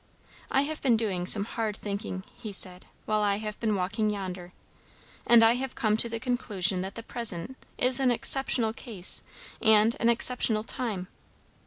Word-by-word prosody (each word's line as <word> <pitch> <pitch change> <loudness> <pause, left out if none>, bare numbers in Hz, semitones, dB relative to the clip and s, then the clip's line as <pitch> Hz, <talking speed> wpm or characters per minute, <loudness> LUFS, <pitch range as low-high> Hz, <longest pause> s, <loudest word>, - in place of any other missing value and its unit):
"I 270 - +2
have 310 +2 -5
been 245 -5 +3
doing 190 -6 -2
some 200 0 +2
hard 220 -2 -3
thinking," 200 -2 -5
he 215 - -7
said, 185 -2 0 0.2
"while 215 0 +1
I 205 -1 +2
have 210 0 -6
been 220 -3 0
walking 195 +3 -1
yonder; 185 -3 -5 0.8
and 235 -1 +7
I 225 - +6
have 260 +1 -4
come 215 -2 +1
to 235 - +3
the 230 0 -4
conclusion 210 -7 0
that 190 +1 -6
the 230 - -7
present 230 -1 -4 0.2
is 255 +1 +4
an 265 -2 +3
exceptional 245 -2 +1
case 210 -7 -1 0.4
and 220 +1 +4
an 235 - +3
exceptional 235 -2 +2
time. 220 -7 -2
220 Hz, 170 wpm, -28 LUFS, 200-235 Hz, 0.8 s, and